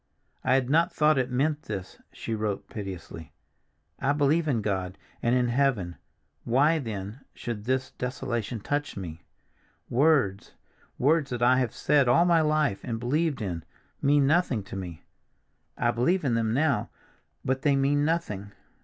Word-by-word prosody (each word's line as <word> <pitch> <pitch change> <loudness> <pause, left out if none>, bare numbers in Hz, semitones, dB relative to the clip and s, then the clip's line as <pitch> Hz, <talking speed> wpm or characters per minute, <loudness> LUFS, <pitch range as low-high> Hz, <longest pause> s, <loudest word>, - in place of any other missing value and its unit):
"I 130 0 +3
had 130 -2 +1
not 165 +5 +3
thought 150 -2 +3
it 130 0 0
meant 145 +4 0
this," 95 -1 -6
she 115 - -5
wrote 105 -2 -2
piteously. 95 -6 -7 0.7
"I 135 +1 +2
believe 150 +3 +2
in 120 -7 0
God, 95 -3 -2 0.2
and 120 +1 +2
in 125 -1 +2
heaven, 120 -9 +1 0.5
why, 145 +7 +3
then, 105 -2 -5 0.2
should 110 -3 -5
this 130 +1 -1
desolation 125 -3 -3
touch 145 +2 -2
me? 85 -3 -7 0.7
Words—words 140 +3 +1
that 120 -1 -2
I 130 +1 +5
have 125 -4 -1
said 145 -3 +3
all 130 +8 +5
my 170 -2 +4
life 150 -8 +1
and 115 -2 -3
believed 145 +2 0
in, 85 -5 -4 0.4
mean 145 0 +4
nothing 140 - +2
to 100 - -9
me. 90 -4 -7 0.7
I - - +2
believe 150 - +1
in 125 - +2
them 115 -1 +1
now, 140 +4 +1 0.6
but 130 0 0
they 145 -1 +3
mean 140 +1 +2
nothing. 105 - -2
125 Hz, 155 wpm, -27 LUFS, 105-145 Hz, 0.7 s, I